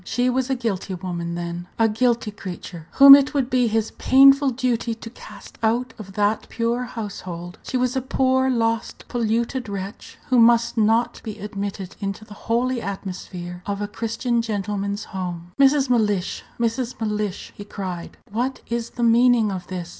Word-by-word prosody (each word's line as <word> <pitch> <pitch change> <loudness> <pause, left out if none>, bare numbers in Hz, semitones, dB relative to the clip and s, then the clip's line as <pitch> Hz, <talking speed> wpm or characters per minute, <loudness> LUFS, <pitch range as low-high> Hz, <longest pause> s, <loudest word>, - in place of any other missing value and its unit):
She 245 +6 0
was 260 +1 -1
a 265 - +1
guilty 200 -6 -3
woman, 170 -2 -4
then 175 0 -5
a 225 - +4
guilty 230 0 +1
creature, 180 -4 -8
whom 275 0 +11
it 285 +1 +6
would 270 -2 0
be 250 -2 +3
his 225 0 0
painful 275 +1 +6
duty 240 -2 -1
to 230 0 -9
cast - - -13
out 240 +3 0
of 195 -2 -9
that 205 +2 0
pure 235 +2 -1
household. 185 -7 -7
She 255 - -3
was 250 0 0
a 265 - +1
poor, 260 0 +1
lost, 230 -2 -1
polluted 235 +1 -1
wretch, 200 +1 -7
who 255 -1 +4
must 235 0 +4
not 225 +1 +2
be 215 -2 -6
admitted 200 -2 -5
into 200 +2 -4
the 210 - -12 0.2
holy 245 +1 +1
atmosphere 180 -3 -6
of 200 0 -2
a 205 - -2
Christian 230 +2 -1
gentleman's 205 -1 -3
home. 180 -3 -6
"Mrs. 275 0 +5
Mellish! 210 -6 0 0.2
Mrs. 235 +1 -1
Mellish!" 210 -3 -3
he 205 - -8
cried, 185 -4 -6
"what 245 +5 -2
is 235 0 -2
the 240 - -1
meaning 235 -2 +4
of 185 -2 -6
this? 180 -2 -5
225 Hz, 170 wpm, -22 LUFS, 195-245 Hz, 0.2 s, whom